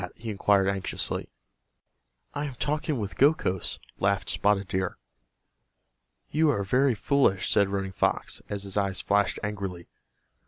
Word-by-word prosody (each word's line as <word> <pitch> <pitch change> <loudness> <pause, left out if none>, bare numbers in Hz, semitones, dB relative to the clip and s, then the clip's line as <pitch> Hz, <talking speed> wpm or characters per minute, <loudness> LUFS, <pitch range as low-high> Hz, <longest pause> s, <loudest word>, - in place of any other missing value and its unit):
he 115 -1 -6
inquired, 100 -1 +3
anxiously. 95 -1 -2 1.0
"I 145 0 -2
am 140 -3 -6
talking 150 +2 -1
with 105 -3 -4
Gokhos," 135 - +2 0.2
laughed - - +1
Spotted 100 -1 +1
Deer. 95 0 -2 1.3
"You 155 +1 +3
are 100 -8 +1
very 125 +5 +2
foolish," 110 -5 +2
said 100 -1 +4
Running 95 -1 -2
Fox, 95 - 0
as 100 -1 -2
his 100 -1 -5
eyes 100 -1 0
flashed 100 0 +1
angrily. 100 -4 -4
100 Hz, 130 wpm, -27 LUFS, 95-130 Hz, 1.3 s, said